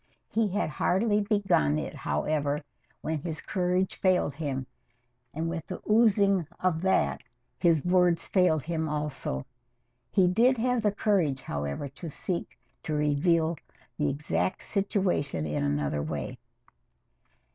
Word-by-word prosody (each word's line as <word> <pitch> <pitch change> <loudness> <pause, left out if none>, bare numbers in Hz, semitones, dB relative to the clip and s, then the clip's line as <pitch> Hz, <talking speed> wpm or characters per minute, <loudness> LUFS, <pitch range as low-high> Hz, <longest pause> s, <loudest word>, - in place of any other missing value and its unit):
He 225 -1 +2
had 205 +2 0
hardly 205 +6 +2
begun 200 - +2
it, - - -4
however, 145 -1 -1 0.4
when 160 -1 -2
his 160 +1 -5
courage 180 0 0
failed 185 -6 +2
him, 140 -4 -3 0.7
and 160 +2 -3
with 165 -1 -4
the 185 - -5
oozing 200 -5 +4
of 180 -3 +1
that 70 - +2 0.4
his 165 -3 +3
words 180 -2 +3
failed 180 -6 +3
him 160 0 -2
also. 150 - -3 0.6
He 190 -3 +4
did 240 +8 +4
have 250 +1 +1
the 210 -1 +2
courage, 190 -10 +1
however, 70 - -3
to 145 +5 -8
seek 170 +4 -4 0.2
to 155 - -3
reveal 160 +3 +2 0.4
the 145 -1 +2
exact 150 +6 -1
situation 190 - 0
in 75 -1 -1
another 75 0 0
way. 75 -2 -4
165 Hz, 130 wpm, -28 LUFS, 140-190 Hz, 0.7 s, oozing